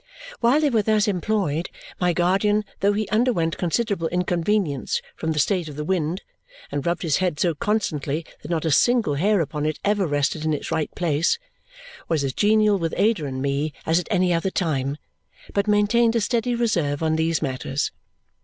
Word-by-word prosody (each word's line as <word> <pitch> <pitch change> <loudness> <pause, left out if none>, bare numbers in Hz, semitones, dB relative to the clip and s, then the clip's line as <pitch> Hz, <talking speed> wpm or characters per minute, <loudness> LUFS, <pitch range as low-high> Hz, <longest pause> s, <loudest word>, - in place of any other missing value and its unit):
While 250 +6 +3
they 295 -2 +2
were 225 -3 +3
thus 215 0 +2
employed, 180 -4 -1 0.3
my 180 -1 +2
guardian, 195 +5 +2
though 200 +1 +3
he 210 0 -1
underwent 215 -8 +1
considerable 190 -1 0
inconvenience 180 -3 0 0.2
from 160 - -2
the 155 - -3
state 175 +1 +1
of 145 - -9
the 150 - -4
wind 175 +1 -1 0.5
and 145 - -2
rubbed 170 +3 -1
his 155 -4 +2
head 180 -5 -1
so 175 -2 +2
constantly 155 -5 -1 0.2
that 150 - -9
not 165 -2 -1
a 160 - +1
single 230 - +3
hair 195 +6 +2
upon 150 -1 -2
it 155 - -2
ever 200 -2 +2
rested 145 +1 0
in 155 -1 +1
its - - -6
right 155 - 0
place, 165 - +1 0.7
was 155 -4 0
as 135 -1 -1
genial 210 -1 +3
with 165 -1 -2
Ada 210 -7 +2
and 130 0 -4
me 140 +2 -1
as 165 +2 +3
at 180 - -6
any 185 -4 +2
other 170 +3 0
time, 140 -6 -1 0.6
but 200 +1 0
maintained 225 +3 +3
a 230 - +2
steady 240 +2 0
reserve 170 -11 0
on 160 0 +2
these 160 0 0
matters. 135 +1 -2
175 Hz, 185 wpm, -23 LUFS, 155-210 Hz, 0.7 s, While